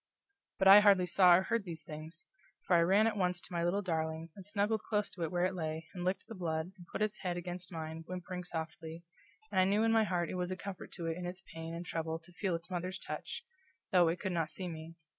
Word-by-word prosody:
But 190 Hz, -, +3 dB
I 195 Hz, +2 st, +12 dB
hardly 200 Hz, -3 st, +6 dB
saw 180 Hz, 0 st, +7 dB
or 185 Hz, -, +3 dB
heard 230 Hz, +1 st, 0 dB
these 165 Hz, -4 st, -6 dB
things, 155 Hz, +2 st, -8 dB, 0.4 s
for 180 Hz, -, +4 dB
I 170 Hz, -, +6 dB
ran 195 Hz, +6 st, +5 dB
at 225 Hz, -, +1 dB
once 180 Hz, -3 st, +1 dB
to 180 Hz, -, -10 dB
my 170 Hz, -1 st, 0 dB
little 190 Hz, +4 st, +1 dB
darling, 160 Hz, -2 st, -2 dB
and 195 Hz, -, -9 dB
snuggled 205 Hz, +2 st, 0 dB
close 210 Hz, -2 st, -1 dB
to 175 Hz, -, -9 dB
it 165 Hz, -, 0 dB
where 175 Hz, 0 st, +2 dB
it 185 Hz, -, 0 dB
lay, 160 Hz, -2 st, -4 dB
and 180 Hz, -2 st, -5 dB
licked 185 Hz, +2 st, -1 dB
the 225 Hz, -, -8 dB
blood, 165 Hz, -3 st, -2 dB
and 175 Hz, -2 st, -14 dB
it -, -, -22 dB
put -, -, 0 dB
its 215 Hz, -1 st, -1 dB
head 180 Hz, -2 st, -2 dB
against 175 Hz, +1 st, -6 dB
mine, 160 Hz, -1 st, -5 dB
whimpering 180 Hz, 0 st, -5 dB
softly, 165 Hz, -1 st, -5 dB, 0.5 s
and 190 Hz, -2 st, +4 dB
I -, -, +5 dB
knew 205 Hz, +3 st, +3 dB
in 225 Hz, -, +4 dB
my 225 Hz, -1 st, +5 dB
heart 175 Hz, -4 st, 0 dB
it -, -, -3 dB
was 180 Hz, -, -1 dB
a 185 Hz, -, -3 dB
comfort 195 Hz, -1 st, -7 dB
to 170 Hz, -, -5 dB
it 165 Hz, 0 st, -1 dB
in 180 Hz, -1 st, -4 dB
its 185 Hz, +2 st, -7 dB
pain 165 Hz, 0 st, -5 dB
and 170 Hz, +1 st, -5 dB
trouble 160 Hz, -1 st, -2 dB
to 170 Hz, +2 st, -19 dB
feel 180 Hz, 0 st, -1 dB
its 170 Hz, +3 st, -8 dB
mother's 180 Hz, +1 st, -2 dB
touch, -, -, -6 dB, 0.5 s
though 180 Hz, -3 st, +6 dB
it 165 Hz, +2 st, 0 dB
could 190 Hz, -, -2 dB
not 165 Hz, -2 st, 0 dB
see 185 Hz, -, -4 dB
me. 165 Hz, 0 st, -7 dB
180 Hz, 260 wpm, -34 LUFS, 165-190 Hz, 0.5 s, I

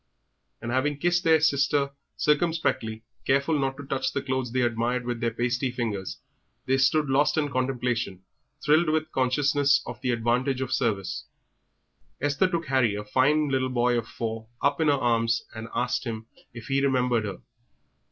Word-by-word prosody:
And 120 Hz, -, -3 dB
having 140 Hz, +3 st, 0 dB
kissed 175 Hz, +3 st, +1 dB
their 160 Hz, -2 st, +5 dB
sister 140 Hz, -1 st, +2 dB, 0.3 s
circumspectly, 150 Hz, -8 st, 0 dB, 0.2 s
careful 140 Hz, +3 st, +2 dB
not 135 Hz, -1 st, -1 dB
to 145 Hz, -, -7 dB
touch 130 Hz, -1 st, -1 dB
the 140 Hz, -, -2 dB
clothes 130 Hz, -3 st, -2 dB
they 130 Hz, +1 st, +1 dB
admired 120 Hz, +1 st, 0 dB
with 120 Hz, -1 st, -3 dB
their 115 Hz, 0 st, +1 dB
pasty 125 Hz, +3 st, -1 dB
fingers, 110 Hz, -6 st, -3 dB, 0.5 s
they 135 Hz, +1 st, +2 dB
stood 145 Hz, +3 st, +3 dB
lost 135 Hz, +4 st, +2 dB
in 150 Hz, -2 st, +1 dB
contemplation, 125 Hz, -7 st, -1 dB, 0.4 s
thrilled 155 Hz, +3 st, +4 dB
with 155 Hz, 0 st, 0 dB
consciousness 140 Hz, +2 st, +2 dB
of 120 Hz, -, -8 dB
the 125 Hz, -, -1 dB
advantage 120 Hz, +3 st, +1 dB
of 130 Hz, -2 st, -2 dB
service. 95 Hz, -5 st, -1 dB, 0.9 s
Esther 145 Hz, +6 st, +2 dB
took 170 Hz, -2 st, -2 dB
Harry, 130 Hz, -6 st, +2 dB
a 105 Hz, 0 st, -5 dB
fine 145 Hz, +6 st, +2 dB
little 130 Hz, -1 st, 0 dB
boy 120 Hz, -1 st, +2 dB
of 115 Hz, -1 st, -2 dB
four, 115 Hz, -1 st, -5 dB
up 140 Hz, +3 st, +1 dB
in 160 Hz, -, +3 dB
her 145 Hz, -, +5 dB
arms, 115 Hz, -3 st, +1 dB
and 110 Hz, 0 st, -7 dB
asked -, -, 0 dB
him 110 Hz, -2 st, -5 dB, 0.3 s
if 120 Hz, -3 st, -10 dB
he 135 Hz, +3 st, +1 dB
remembered 125 Hz, -4 st, +1 dB
her. 100 Hz, -, -5 dB
130 Hz, 170 wpm, -26 LUFS, 120-145 Hz, 0.9 s, their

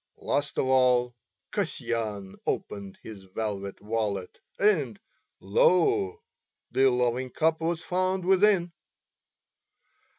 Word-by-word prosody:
Last 145 Hz, 0 st, -2 dB
of -, -, +2 dB
all 125 Hz, -2 st, +3 dB, 0.4 s
Kasyan 105 Hz, -5 st, -3 dB
opened 100 Hz, -2 st, -3 dB
his 100 Hz, -3 st, -10 dB
velvet 100 Hz, 0 st, -4 dB
wallet 105 Hz, -3 st, -3 dB, 0.2 s
and, 155 Hz, -, +2 dB, 0.4 s
lo! 400 Hz, -, +2 dB, 0.5 s
the 135 Hz, 0 st, +4 dB
loving 125 Hz, +1 st, 0 dB
cup 160 Hz, +4 st, +1 dB
was 165 Hz, 0 st, -1 dB
found 185 Hz, 0 st, 0 dB
within. 190 Hz, -2 st, +4 dB
125 Hz, 95 wpm, -27 LUFS, 105-175 Hz, 0.5 s, the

